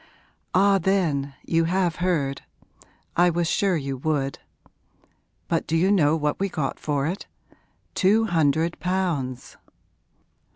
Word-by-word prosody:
'Ah 195 +1 +5
then, 160 -7 0
you 165 0 +2
have 175 -1 0
heard? 155 -7 0 0.7
I 175 +1 +5
was 170 0 0
sure 190 +1 +1
you 135 -2 -4
would! 140 -1 -1 1.1
But 165 - -1
do 165 - +1
you 185 +4 +3
know 160 -6 +4
what 150 -2 -1
we 195 +1 0
got 150 -6 -3
for 145 -2 -1
it? 175 +6 -4 0.7
Two 215 +4 +3
hundred 160 -2 +1
pounds.' 165 -8 -2
165 Hz, 125 wpm, -24 LUFS, 145-185 Hz, 1.1 s, Ah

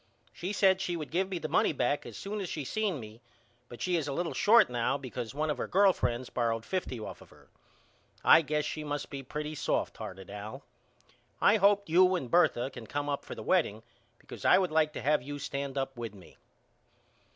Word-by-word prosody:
She 180 +3 -4
said 190 -2 +3
she 175 -3 -2
would 155 -3 -6
give 185 +3 0
me 190 - -2
the 160 - -4
money 155 - +2
back 145 +1 0
as - - -9
soon 205 +1 -4
as 185 - -4
she 150 -3 -4
seen 205 -2 -1
me 110 0 -11 0.5
but 120 - -7
she 180 -1 +1
is 155 -3 -2
a 140 - -2
little 170 +3 -2
short 230 +3 +6
now 120 +2 0
because 125 -2 -6
one 155 +1 0
of 140 - -4
her - - -2
girl 195 0 +5
friends 120 -3 -2
borrowed 115 -1 -1
fifty 180 -10 -3
off 110 - -8
of - - -15
her. - - -20 0.8
I - - +8
guess 150 0 -1
she 155 - -4
must 145 -1 -4
be 140 -1 -5
pretty 150 +3 -5
soft 150 - -1
hearted 95 0 -8
Al. 105 +1 -7 0.8
I 210 - +5
hope 200 0 +3
you 185 +3 +5
and 135 -9 -4
Bertha 135 -7 +3
can 115 -3 -10
come 145 0 -3
up 140 - -2
for - - -8
the - - -7
wedding 115 - +1 0.3
because - - -11
I - - +6
would 185 -3 +1
like 155 -1 +3
to - - -6
have 150 0 +3
you 145 +3 -6
stand 140 -1 -4
up 135 0 -2
with 115 -3 -6
me. 95 -3 -16
150 Hz, 220 wpm, -30 LUFS, 125-180 Hz, 0.8 s, I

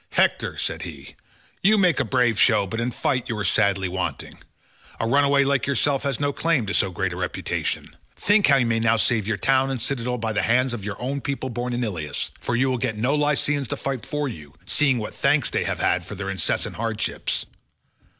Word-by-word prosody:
"Hector," - - +1
said - - -2
he, - - -9 0.5
"you 215 +3 +5
make 180 -6 +3
a - - +3
brave 120 -2 +1
show, 110 -4 +4
but 115 +4 -3
in 120 - 0
fight 125 +1 -1
you 115 - -2
are 105 - -2
sadly 95 0 +2
wanting. 90 0 -4 0.6
A - - 0
runaway 140 +2 +4
like 140 -1 +1
yourself 140 0 +1
has 140 -3 -2
no 145 0 0
claim 165 -8 +1
to 100 - -3
so 95 - +2
great 90 - -2
a - - -7
reputation. - - -3 0.2
Think 205 0 +3
how 140 - +6
you 130 -3 +3
may 115 -1 +1
now 115 0 +3
save 110 -1 +1
your 110 -2 0
town 135 +3 +2
and 135 -2 -2
citadel 125 +1 -2
by 110 -1 -2
the 105 - +1
hands 125 +2 +2
of 110 -4 -5
your 105 0 -5
own 135 +3 -3
people 135 -2 -3
born 120 +1 -3
in 120 0 -1
Ilius; 85 -10 -3
for 120 - -2
you 130 +3 +2
will 125 - -1
get 115 -3 -2
no 125 +6 +1
Lycians 145 -2 +1
to - - -3
fight 135 -4 -3
for 150 -1 -2
you, 75 - -9
seeing 130 +7 +2
what 110 - -5
thanks - - +2
they - - 0
have - - -2
had 90 - +1
for 100 - -8
their 95 0 -4
incessant 95 -5 -1
hardships. 110 -1 -2
120 Hz, 220 wpm, -23 LUFS, 110-140 Hz, 0.6 s, how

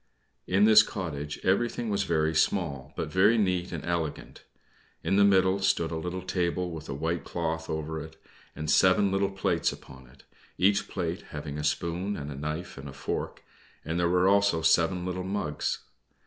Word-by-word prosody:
In 95 +3 +3
this 110 0 +9
cottage 75 -9 -5
everything 115 +4 +1
was 100 -1 0
very 80 -2 +1
small, 75 -5 0
but 75 - -4
very 100 +6 +4
neat 90 -4 0
and 85 -4 -5
elegant. 85 -3 -3 0.6
In 95 - +1
the 100 - +5
middle 95 -1 +4
stood 85 -4 +1
a - - -2
little 90 +3 -4
table 90 -1 -1
with 80 -2 -8
a - - -2
white 80 +4 -2
cloth 80 -1 -3
over 80 0 -3
it, 80 0 -13 0.4
and 75 - -5
seven 95 +1 +4
little 95 0 +1
plates 95 0 0
upon 65 -1 -13
it, 65 +2 -20 0.3
each 100 +3 +3
plate - - -4
having 75 +1 -6
a - - -3
spoon 85 +6 -1
and 75 0 -6
a - - -6
knife 75 +3 -5
and 70 +1 -8
a - - -9
fork, - - -4 0.4
and 80 +2 -2
there 85 0 +2
were 90 +1 +3
also 100 -4 +3
seven 85 +2 +3
little 90 0 -3
mugs. 95 -6 -2
85 Hz, 180 wpm, -28 LUFS, 80-95 Hz, 0.6 s, this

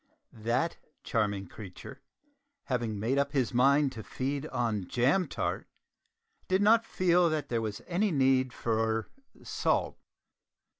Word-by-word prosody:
That 120 +9 -1 0.3
charming 100 -4 -1
creature, 95 0 -10 0.6
having 115 -5 -2
made 125 +6 +1
up 140 0 0
his 130 -5 0
mind 140 +3 +4
to 115 -4 -8
feed 140 +6 -3
on 110 - -1
jam 140 +10 +2
tart, - - -3 0.8
did 190 +2 +2
not 225 +2 +5
feel 180 -1 +3
that 155 -1 -2
there 115 -2 0
was 105 -2 -4
any 190 +4 +1
need 130 -4 +2
for 110 -1 -1 0.3
salt. - - 0
130 Hz, 130 wpm, -30 LUFS, 110-150 Hz, 0.8 s, not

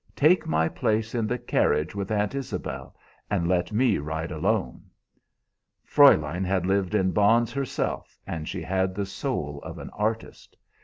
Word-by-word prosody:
Take 160 +5 +4
my 80 +1 +2
place 110 0 -1
in 115 -3 0
the 125 - -1
carriage 75 -8 +1
with 100 -1 -4
Aunt 105 +1 0
Isabel, 90 - -5 0.3
and 85 - 0
let 90 +2 +1
me 115 0 +2
ride 80 +3 -4
alone.' 95 +6 -1 1.0
"Fräulein 90 +3 +5
had 95 -1 0
lived 95 0 +1
in 95 -3 +2
bonds 115 +3 +3
herself, 140 -2 -3
and 80 -2 -5
she - - -4
had 95 0 0
the 100 0 -2
soul 85 - -4
of - - -8
an - - -8
artist. 110 +2 -4
100 Hz, 155 wpm, -26 LUFS, 85-110 Hz, 1.0 s, Fräulein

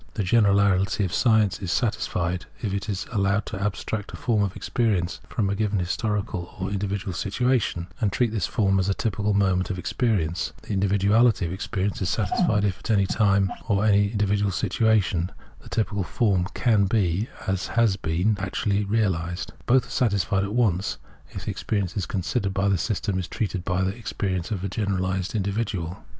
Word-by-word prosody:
The 105 - 0
generality 100 -1 +3
of 90 - -4
science 110 -5 +3
is 95 -3 -3
satisfied 90 -6 -1
if 105 -4 -2
it 100 +2 -3
is 100 -2 -2
allowed 100 -1 +1
to 95 - -5
abstract 105 +1 -3
a - - -6
form 115 -4 +1
of 100 -2 -1
experience 100 -7 0
from 105 -4 0
a 100 - 0
given 105 0 0
historical 95 -1 -2
or 95 +1 -3
individual 100 -1 -2
situation, 105 -2 0 0.2
and 105 - +2
treat 120 +2 +1
this 105 -7 -1
form 95 -3 +2
as 95 +1 +1
a 100 - +1
typical 105 -1 0
moment 95 -2 +2
of 95 - -2
experience; 90 - -1
the 105 - -3
individu 100 0 +1
ality 115 -3 +4
of 85 - -3
experience 100 +1 -2
is 90 - 0
satisfied 105 - +1
if 95 -2 -1
at - - -9
any 100 -3 +4
time, 100 -2 +2
or 100 +1 +2
in 105 - +5
any 100 0 +4
individual 105 -1 +1
situation, 95 -3 +1 0.3
the - - -13
typical 105 -3 -1
form 95 -3 +1
can 110 -5 +3
be, 100 +1 +1
has 95 -1 -2 0.3
been, 90 +3 0
or - - +4
is, 105 - 0
actually 100 +1 0
realised; 90 -5 -1
both 125 0 +4
are - - -15
satisfied 100 -5 +1
at 100 +2 -3
once 100 -6 +1 0.3
if - - -7
the - - -1
experience 100 -1 -2
considered 100 +1 -1
by 100 +1 +1
this 95 -3 +2
system 100 -3 -1
is 90 - -4
treated 95 -4 -3
as 95 +1 +1
the 95 - -2
experience 95 -6 -3
of 100 -4 -3
a - - 0
generahsed 95 -1 -1
individual. 100 -4 -2
100 Hz, 185 wpm, -25 LUFS, 95-105 Hz, 0.3 s, in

